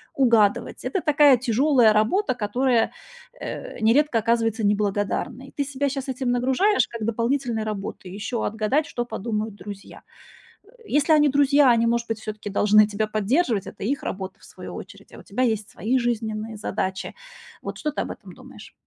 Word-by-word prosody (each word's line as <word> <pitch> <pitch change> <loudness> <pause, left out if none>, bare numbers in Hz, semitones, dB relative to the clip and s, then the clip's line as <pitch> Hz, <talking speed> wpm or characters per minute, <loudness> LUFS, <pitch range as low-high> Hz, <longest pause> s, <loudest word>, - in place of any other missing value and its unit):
угадывать 230 -6 +2
это 385 - -1
такая 290 -3 +5
тяжёлая 245 -1 +3
работа, 255 - +2
которая, 240 +1 +1 0.5
э, - - -7
нередко 245 +3 +3
оказывается 225 -1 0
неблагодарной. 205 +5 -1
Ты 285 - 0
себя 280 0 -2
щас 275 0 -4
этим 255 -1 -1
нагружаешь 265 - +2
как 230 -2 -6
дополнительной 230 0 -1
работой, 195 -3 -6
еще 220 +4 -3
отгадать, 220 +8 0
что 240 0 -3
подумают 215 -2 -3
друзья. 200 0 -10 0.6
Э, - - -24 0.2
если 295 +2 +2
они 300 -1 +5
друзья, 280 0 +4
они, 230 0 +3
может 235 0 0
быть, 225 -1 -2
всё-таки 215 -1 -6
должны 210 +1 +5
тебя 215 +1 -2
поддерживать, 215 - 0
это - - -8
их 275 +5 -1
работа, 190 -1 -5
в - - -19
свою - - -10
очередь, - - -11
а - - -12
у - - -11
тебя 255 - -3
есть 220 -4 0
свои 250 +4 0
жизненные 220 -2 -2
задачи. 190 -2 -3 0.5
Вот - - -6
что 300 - -2
ты - - -3
об - - -3
этом - - -10
думаешь? - - -14
230 Hz, 170 wpm, -24 LUFS, 215-270 Hz, 0.6 s, такая